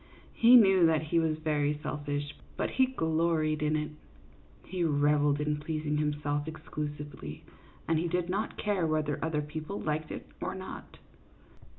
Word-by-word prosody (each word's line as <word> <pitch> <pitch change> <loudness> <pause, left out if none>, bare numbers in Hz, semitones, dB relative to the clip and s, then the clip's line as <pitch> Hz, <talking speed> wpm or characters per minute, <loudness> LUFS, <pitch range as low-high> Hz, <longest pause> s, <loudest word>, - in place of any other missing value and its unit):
He 235 +2 +7
knew 190 -7 +7
that 160 -1 +2
he 165 +2 +1
was 160 -1 +1
very 150 -2 0
selfish, 145 0 -3 0.2
but - - -1
he 260 0 +3
gloried 160 - +1
in 150 0 +1
it; 150 0 -2 0.7
he 180 -1 -2
revelled 145 -1 +3
in 150 0 0
pleasing 150 0 -2
himself 145 0 -1
exclusively, 150 - -6 0.4
and 160 -1 +2
he 170 - 0
did 175 0 0
not 200 +4 -2
care 200 -5 0
whether 155 -2 0
other 155 -2 0
people 155 +6 -5
liked 155 0 -2
it - - -6 0.2
or - - -3
not. - - -8
155 Hz, 155 wpm, -30 LUFS, 150-165 Hz, 0.7 s, He